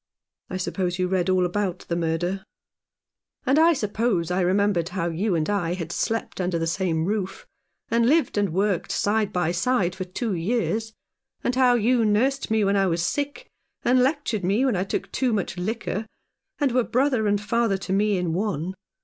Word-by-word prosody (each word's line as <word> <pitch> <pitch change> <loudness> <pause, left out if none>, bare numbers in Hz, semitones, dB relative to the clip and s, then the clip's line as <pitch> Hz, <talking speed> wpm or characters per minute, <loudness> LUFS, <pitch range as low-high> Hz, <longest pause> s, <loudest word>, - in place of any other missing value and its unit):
I 185 - -3
suppose 180 -1 -2
you 185 0 +1
read 185 0 0
all 185 -1 +3
about 185 0 -2
the 170 - -1
murder? 175 +3 -1 0.5
" - - -51
"And 275 +3 +4
I 335 +1 +6
suppose 210 - 0
I 180 +1 +1
remembered 185 -1 +2
how 175 -2 -2
you 180 +4 0
and 155 -2 0
I 180 -4 0
had 170 -2 -5
slept 225 0 -2
under 180 -1 0
the 165 - -1
same 165 -1 0
roof, 195 -1 -3 0.5
and 230 +1 +3
lived 320 +2 +2
and 205 -2 +1
worked 195 0 0
side 210 0 +1
by 175 -4 0
side 190 0 +1
for 185 +1 -4
two 200 +4 -3
years, 220 +4 -1 0.5
and 245 - +1
how 255 -1 +5
you 240 +1 +3
nursed 245 +6 +1
me 220 -1 +2
when 200 0 +2
I 195 -1 +3
was 170 -1 0
sick, 290 - -3 0.4
and 250 +1 +4
lectured 260 - 0
me 205 +8 +2
when 255 -6 +2
I 185 +1 0
took - - -3
too 255 -3 0
much 200 -4 -1
liquor, 215 +2 -3 0.5
and 285 -4 +2
were 250 0 +2
brother 250 -3 +1
and 205 0 +2
father 225 -1 +1
to 190 0 -4
me 205 0 +2
in 175 -2 -1
one. 185 -2 -2
200 Hz, 190 wpm, -24 LUFS, 180-230 Hz, 0.5 s, I